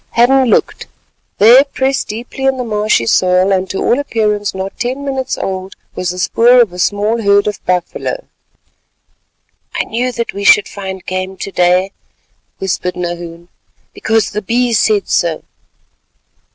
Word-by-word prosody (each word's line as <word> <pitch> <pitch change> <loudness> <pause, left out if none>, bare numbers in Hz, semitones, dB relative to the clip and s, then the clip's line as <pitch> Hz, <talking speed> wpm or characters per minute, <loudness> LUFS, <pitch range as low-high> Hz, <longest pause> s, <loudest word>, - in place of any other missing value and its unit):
Hadden 260 +3 +4
looked; - - 0 0.5
there, 240 +6 +7
pressed 270 -1 -2
deep 230 +3 -7
in 270 0 +1
the 250 - -2
marshy 210 - 0
soil, 185 +7 +2
and 190 -1 0
to 195 - -4
all 245 - +1
appearance 210 -7 -1
not 190 +1 -6
ten 260 +4 -3
minutes 265 -2 -3
old, 190 0 -5 0.2
was 180 - -3
the 180 - -4
spoor 235 +6 +4
of 225 -7 +3
a 180 - -8
small 210 +5 0
herd 200 -1 +3
of 210 -1 -4
buffalo. 180 - -2 1.5
"I - - 0
knew 245 +3 -2
that 235 -1 -4
we 200 - -5
should 205 +1 +5
find 190 -2 -7
game 185 +1 -4
to 195 - -6
day," 180 +1 +2 0.7
whispered 180 -1 -2
Nahoon, 175 -1 -6 0.4
"because 220 -3 0
the 210 - -3
Bee 240 +4 0
said 210 -2 +2
so." 165 -2 0
205 Hz, 150 wpm, -14 LUFS, 185-240 Hz, 1.5 s, there